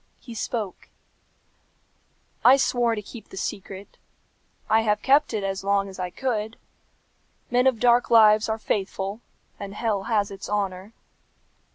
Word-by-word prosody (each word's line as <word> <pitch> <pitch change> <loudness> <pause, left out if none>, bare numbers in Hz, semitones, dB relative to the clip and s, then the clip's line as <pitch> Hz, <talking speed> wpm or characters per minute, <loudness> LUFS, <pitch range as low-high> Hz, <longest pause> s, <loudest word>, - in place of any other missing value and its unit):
He 240 - -11
spoke, 220 -3 -4 1.5
"I 260 +2 +8
swore 240 -3 +1
to 210 - -6
keep 225 +2 -12
the - - -11
secret. 195 0 -6 0.7
I 220 +1 +4
have 210 -1 0
kept 280 +3 +4
it 210 -2 -2
as 195 -1 -3
long 200 0 +1
as 190 -1 -11
I 180 -1 -2
could. 220 -1 -3 0.9
Men 250 +2 +3
of 250 -4 +2
dark 245 0 +3
lives 215 -1 +6
are 220 - 0
faithful, 200 0 -3 0.4
and 200 0 -7
hell 210 -4 -1
has 210 -3 0
its 195 -1 -8
honour. 200 0 -3
210 Hz, 145 wpm, -24 LUFS, 195-235 Hz, 1.5 s, I